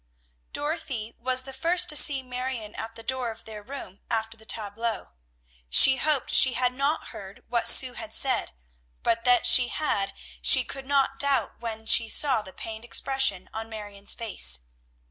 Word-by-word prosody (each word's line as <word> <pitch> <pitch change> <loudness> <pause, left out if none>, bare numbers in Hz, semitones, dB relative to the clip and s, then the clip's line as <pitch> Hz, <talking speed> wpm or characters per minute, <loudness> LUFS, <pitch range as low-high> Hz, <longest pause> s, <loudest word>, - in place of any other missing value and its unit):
Dorothy 290 -7 -4
was 255 +1 +1
the 270 0 -8
first 350 +6 +2
to 300 - +3
see 280 -2 +3
Marion 250 -4 -6
at 225 +1 -7
the 230 - -10
door 255 0 -3
of 225 0 -10
their 215 -1 -9
room 205 -5 -10
after 225 0 -2
the 220 -1 -18
tableaux. 220 - -4 0.6
She 265 - +7
hoped 295 -1 0
she 260 - +6
had 250 0 0
not 280 +4 -2
heard 195 -1 -11
what 235 -1 +3
Sue 255 -1 +6
had 220 -3 -7
said, 260 +1 0 0.5
but 230 +1 -1
that 245 -1 +4
she 250 -1 +6
had 205 -9 -2 0.3
she 260 - +6
could 270 +1 -7
not 275 -1 0
doubt 275 -5 -1
when 225 -1 -7
she 225 0 +3
saw 265 -4 +1
the 190 - -10
pained 220 +3 -8
expression 240 -6 0
on 225 0 -6
Marion's 205 -2 -3
face. 65 - -2
240 Hz, 170 wpm, -25 LUFS, 220-270 Hz, 0.6 s, She